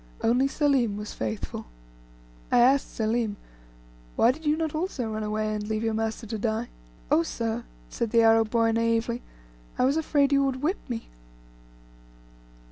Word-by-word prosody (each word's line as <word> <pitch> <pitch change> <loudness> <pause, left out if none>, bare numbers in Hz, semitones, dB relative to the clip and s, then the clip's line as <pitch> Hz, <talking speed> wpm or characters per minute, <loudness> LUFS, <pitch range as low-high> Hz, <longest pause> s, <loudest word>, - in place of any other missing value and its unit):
Only 250 +4 +3
Selim 270 -7 +1
was 210 0 -6
faithful. 110 - -4 0.8
I - - +4
asked 260 +3 +4
Selim, 220 -1 0 0.8
"Why 235 - +5
did 310 +3 -8
you 300 +1 +3
not 320 -2 -2
also 310 -9 -2
run 215 - -3
away, 215 0 -1
and 210 0 -4
leave 220 0 -1
your 225 -1 0
master 225 +1 -2
to 220 0 -4
die?" 225 +2 -1 0.4
"Oh, - - +5
sir," 230 +6 -3 0.2
said 225 - -3
the 230 +1 +4
Arab 225 -1 +5
boy, 230 0 +2
naively, 230 +1 0 0.6
"I 250 - +3
was 275 +4 +2
afraid 290 -3 +2
you 275 0 +4
would 265 0 -1
whip 355 +7 +1
me." 230 -2 -4
230 Hz, 160 wpm, -26 LUFS, 220-270 Hz, 0.8 s, Why